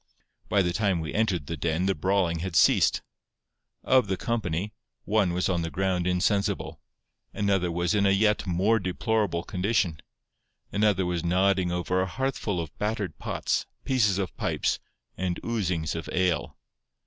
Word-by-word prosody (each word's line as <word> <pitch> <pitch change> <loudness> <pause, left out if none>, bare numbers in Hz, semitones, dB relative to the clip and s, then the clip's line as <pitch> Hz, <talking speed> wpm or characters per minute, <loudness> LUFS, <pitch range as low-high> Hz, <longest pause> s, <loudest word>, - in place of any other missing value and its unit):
By 100 -2 +3
the 85 -1 0
time 100 -3 +1
we 80 -1 -4
entered 100 -8 0
the 85 - -4
den 80 +3 -1
the 95 - +2
brawling 90 0 +1
had 90 0 -4
ceased. - - +4 0.8
Of 130 -4 +4
the 95 -1 -1
company, 105 -4 -2 0.3
one 105 -4 +2
was 90 +1 0
on 90 -2 0
the 80 - -3
ground 90 -1 0
insensible; 100 +3 0 0.5
another 95 -4 +1
was 85 +3 0
in 100 -1 +3
a - - +4
yet 105 +1 +2
more 95 +6 +2
deplorable 95 -2 -1
condition; 90 -4 0 0.7
another 100 -3 +2
was 90 -2 -2
nodding 90 +1 +2
over 90 +1 0
a 95 - 0
hearthful 110 -3 -2
of 80 -2 -6
battered 105 -6 -2
pots, - - -1 0.2
pieces 110 -8 +2
of 95 -4 -3
pipes, - - 0 0.4
and 90 -2 -1
oozings 90 -9 -1
of 80 - -5
ale. 90 -2 0
95 Hz, 155 wpm, -27 LUFS, 85-105 Hz, 0.8 s, ceased